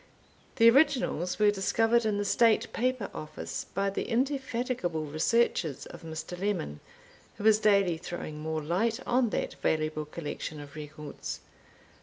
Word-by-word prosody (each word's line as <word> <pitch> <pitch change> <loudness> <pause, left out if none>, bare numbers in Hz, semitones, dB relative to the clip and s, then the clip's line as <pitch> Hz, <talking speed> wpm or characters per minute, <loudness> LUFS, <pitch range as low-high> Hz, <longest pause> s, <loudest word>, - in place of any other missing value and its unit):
The 230 -3 +6
originals 245 - +3
were 210 -1 +5
discovered 225 +4 +2
in 210 -2 +1
the 205 - -1
State 230 +1 +3
Paper 255 -3 -1
Office, 155 - -6
by 195 +1 +1
the - - -3
indefatigable 245 - -1
researches 155 - +1
of - - -11
Mr. 160 +2 -6
Lemon, 185 - -2 0.6
who 205 - -6
is 215 -1 +6
daily 200 -5 +3
throwing 160 -3 -6
more 155 0 -3
light 210 +9 0
on 245 -1 +2
that - - -2
valuable 155 -1 0
collection 150 0 -6
of 145 -1 -10
records. 150 -1 -7
195 Hz, 140 wpm, -29 LUFS, 155-230 Hz, 0.6 s, The